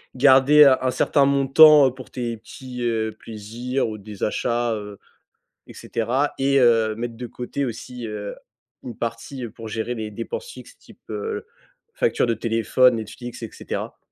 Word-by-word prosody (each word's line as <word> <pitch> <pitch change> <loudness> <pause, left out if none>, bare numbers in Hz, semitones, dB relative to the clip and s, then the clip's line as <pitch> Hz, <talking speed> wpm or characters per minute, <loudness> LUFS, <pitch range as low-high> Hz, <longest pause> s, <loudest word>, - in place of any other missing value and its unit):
garder 135 +3 +6
un 135 -2 +6
un 130 - +1
certain 140 +2 +2
montant, 140 +2 +7
heu, 130 - -2
pour 130 -1 -12
tes 120 -2 -4
petits, 125 +2 -10
heu, 115 -2 -1
plaisirs 115 +5 -4
ou 110 -1 -6
des 100 0 -9
achats, 120 +2 0
heu 105 -2 -7 0.7
et - - -13
cetera 125 +6 -1
et 140 +1 +2
heu, 115 -3 +4
mettre 115 +1 -5
de 125 - -6
côté 125 +4 -4
aussi, 120 0 -7
heu, 105 -2 -6 0.5
une 120 - -7
partie 120 +3 -5
pour 110 +1 -10
gérer 110 +3 -3
les 110 -2 -5
dépenses 475 - -5
fixes, - - -13
type, - - -19
heu, 445 0 -4 0.5
facture 480 - +1
de 115 - +1
téléphone, 115 +2 +2
Netflix 120 +3 -8
et 115 - -5
cetera? - - -6
120 Hz, 165 wpm, -23 LUFS, 110-135 Hz, 0.7 s, montant